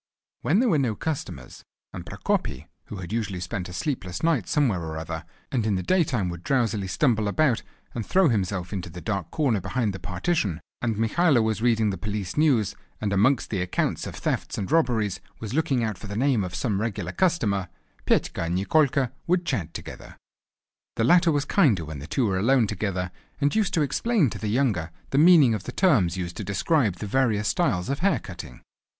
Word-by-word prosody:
When 180 +7 +2
there 250 0 +3
were 155 - +3
no 120 -6 0
customers, 155 +5 -5 0.3
and - - -6
Prokopy, - - -2 0.2
who 105 - -8
usually 105 -3 -2
had 90 - -4
spent 90 +1 -4
a - - -9
sleepless 105 - -3
night 155 - +2
somewhere 120 - +1
or 80 -1 -5
other, 80 0 -5 0.3
and 120 -4 0
in 105 -2 +1
the 90 - -2
daytime 145 - +1
would 85 -1 -6
drowsily 110 -6 0
stumble 110 -1 +1
about 125 +2 +2 0.3
and 115 - -3
throw 190 - +3
himself 95 - -1
into 95 -2 -4
the 85 +2 -8
dark 100 -4 -3
corner 130 -10 +1
behind 115 -1 -1
the 95 - -6
partition, 95 - -1 0.2
and 115 -3 -1
Mikhailo 125 +3 +3
was 110 -1 -1
reading 115 -3 +2
the 95 - -5
Police 105 -3 -4
News, 135 -10 +2 0.2
and 100 -2 -1
amongst 115 +6 +2
the 95 -4 -1
accounts 90 0 -1
of - - -7
thefts - - -2
and 100 - -3
robberies 115 - +2 0.2
was 110 +1 -6
looking 145 -5 +1
out 110 -4 -2
for 105 - -8
the 100 - -5
name 130 -4 +2
of 90 -1 -5
some 105 -6 -1
regular 110 -3 -3
customer, 110 - +1 0.4
Petka - - +1
and 85 +1 -1
Nikolka 135 +4 +2 0.2
would 175 0 +2
chat 85 - -2
together. - - -9 0.8
The 115 - 0
latter 170 +6 +5
was 145 -1 0
kinder 120 - +3
when 75 -2 -7
the 75 - -8
two 125 - 0
were 95 -3 0
alone 125 +3 +4
together, 95 -4 -2 0.3
and 145 0 +2
used 215 -3 +1
to 160 - +3
explain 170 - +1
to - - -6
the 110 - -3
younger 105 -9 +1 0.2
the 135 - +3
meaning 155 -7 +7
of 105 -4 -4
the - - -4
terms 110 - +3
used 85 -1 -4
to - - -4
describe 105 - +1
the 105 - -6
various 105 -2 +1
styles 95 - 0
of 140 +1 -2
hair 190 -5 +3
cutting. 85 - -10
110 Hz, 200 wpm, -25 LUFS, 95-140 Hz, 0.8 s, meaning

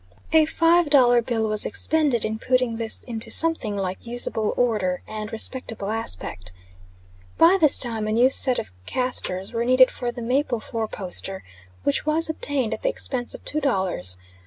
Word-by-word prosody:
A 315 -1 +5
five 330 0 +2
dollar 245 -4 +5
bill 225 -2 -2
was 215 -1 -1
expended 295 -3 -1
in 220 0 -4
putting 250 -2 0
this 225 -1 -4
into 230 -2 -6
something 320 -11 +3
like 190 -1 -4
usable 235 -2 +2
order 210 -7 -1
and 215 0 -6
respectable 225 -3 -3
aspect. 90 - -4 0.8
By 360 +4 +5
this 305 -3 +7
time 225 -3 -2
a - - -2
new 245 +4 +3
set 255 -1 +3
of 90 - -5 0.2
castors 245 -6 -1
was 230 0 -1
needed 255 0 +5
for 245 -1 -4
the 240 -1 -8
maple 250 0 -1
four 220 0 -4
poster, 190 -1 -3 0.4
which 140 - 0
was 315 +1 +1
obtained 280 -7 -2
at - - -6
the - - 0
expense 255 - -3
of - - -14
two 305 - 0
dollars. 190 - +1
235 Hz, 170 wpm, -23 LUFS, 215-265 Hz, 0.8 s, this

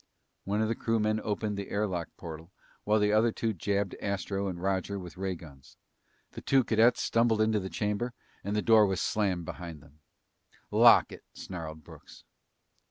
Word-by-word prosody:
One 105 +2 0
of - - +1
the 115 - 0
crewmen 110 -1 0
opened 105 -1 -2
the 100 - -5
air 105 +1 0
lock 90 -4 -3
portal 80 +1 -9 0.3
while 105 +1 +3
the 105 0 +2
other 110 +2 +4
two 110 0 -2
jabbed 100 +1 -1
Astro 100 0 -2
and 90 -2 -4
Roger 95 +1 -1
with 90 -2 -8
ray 95 0 -3
guns. 70 -5 -15 0.5
The - - -9
two 135 -1 +3
cadets 115 +2 +3
stumbled 115 -1 +2
into 110 -1 +2
the 95 -1 -5
chamber 105 +5 -2 0.3
and 100 +1 -2
the 105 - 0
door 110 -3 +6
was 95 -2 -1
slammed 95 -6 0
behind 85 -3 -7
them. 75 0 -21 0.7
"Lock - - +6
it!" - - -11
snarled 80 -4 -7
Brooks. - - -15
100 Hz, 175 wpm, -29 LUFS, 90-110 Hz, 0.7 s, door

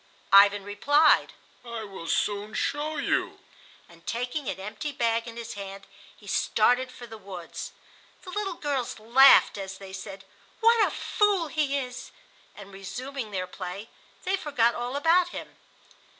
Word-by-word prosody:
Ivan 200 0 +7
replied, 290 +10 +3 0.3
"I 235 -2 -6
will 190 -5 -9
soon 205 +3 -1
show 300 +2 -1
you," - - 0 0.5
and, 170 0 -20
taking 250 +2 -3
an 190 - -4
empty 210 +9 -5
bag 230 -2 0
in 230 0 -9
his 235 - -6
hand, 195 -1 -8 0.3
he 210 - -18
started 245 +5 +2
for 245 - -10
the 225 -2 -11
woods. 185 -4 -8 0.5
The 365 - -9
little 390 -2 -3
girls 280 -6 -2
laughed 235 0 +6
as 195 0 -6
they 190 -1 -11
said, 195 0 -8 0.3
"What 455 -1 +5
a - - -2
fool 400 -6 +1
he 290 -3 0
is!" 250 -2 -6 0.5
and 200 -1 -12
resuming 245 +6 -6
their 185 -3 -3
play 185 +4 -7 0.3
they 375 +1 +1
forgot 240 -9 +1
all 245 +2 -4
about 335 +5 +4
him. - - -8
235 Hz, 150 wpm, -27 LUFS, 200-285 Hz, 0.5 s, Ivan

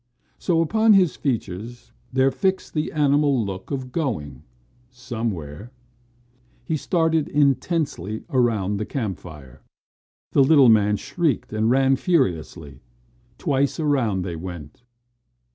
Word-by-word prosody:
So 165 -2 +1
upon 220 +6 +3
his 185 -4 +4
features 115 -2 -4 0.2
there 130 +1 +3
fixed 190 +9 -1
the 155 -1 -2
animal 145 -4 +2
look 95 -1 -7
of 130 -3 -4
going 100 - -3 0.5
somewhere. 115 - -5 1.0
He 160 - -1
started 160 0 +1
intensely 140 - 0
around 110 -7 +1
the 105 - -3
campfire. 80 - -6 0.7
The 140 - +5
little 135 -3 +6
man 105 -2 +4
shrieked 160 - -2
and 110 +1 +1
ran 135 +1 +3
furiously. 85 - -1 0.6
Twice 140 +2 0
around 125 - +1
they 90 -2 -5
went. 85 -2 -9
125 Hz, 110 wpm, -23 LUFS, 100-145 Hz, 1.0 s, little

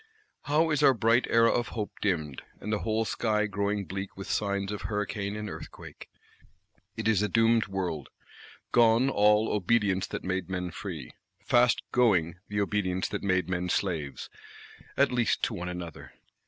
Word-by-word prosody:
How 155 +3 +2
is 150 - +1
our 135 - +6
bright 115 +3 +3
Era 115 0 +5
of 120 - 0
Hope 105 -3 -4
dimmed: 80 -9 -1 0.2
and 105 - -3
the 105 - 0
whole 110 0 0
sky 105 -1 0
growing 100 0 -1
bleak 95 +2 -6
with 95 - -7
signs 100 -1 -1
of 105 -2 -4
hurricane 105 +1 -3
and 105 0 -5
earthquake! - - -10 0.9
It - - -2
is 105 -3 +3
a 105 - 0
doomed 115 -1 +3
world: 90 -7 -3 0.6
gone 120 +3 +4
all 105 0 +4
"obedience 100 -1 +1
that - - -5
made 95 -1 -2
men 90 -1 -3
free;" 80 - -7 0.3
fast 120 0 +3
going 95 -9 +2
the 105 0 -1
obedience 95 -2 0
that - - -3
made 95 -2 +1
men 90 -1 -2
slaves,—at 80 -8 -3
least 120 -2 +1
to - - 0
one 90 +1 -4
another. 90 -3 -7
100 Hz, 160 wpm, -28 LUFS, 95-110 Hz, 0.9 s, our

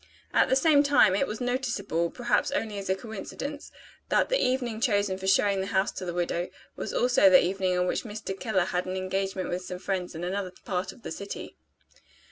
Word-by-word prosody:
At - - +4
the 260 - +4
same 290 +1 +5
time, 280 -9 +5
it 275 +7 +1
was 215 - -5
noticeable 230 -9 -1
(perhaps 240 +4 0
only 225 -8 -2
as 195 - -6
a 190 - +3
coincidence) 235 +8 -7 0.4
that - - +2
the - - +2
evening 245 -3 0
chosen 205 -6 +2
for 190 - -4
showing 195 0 +3
the 190 - -3
house 195 0 +1
to 185 - -6
the 175 - -3
widow, 175 0 -1 0.3
was - - -4
also 245 -5 +4
the 185 - +7
evening 185 0 0
on 180 - +2
which - - 0
Mr. 215 -3 -6
Keller 195 -7 +1
had 180 0 -2
an 185 +1 -3
engagement 190 0 -2
with 180 +1 -2
some 180 0 -6
friends 180 -2 -3
in 165 - -5
another 185 0 -3
part 185 -1 -2
of 240 - -18
the - - -6
city. 200 +5 -7
195 Hz, 210 wpm, -27 LUFS, 185-240 Hz, 0.4 s, the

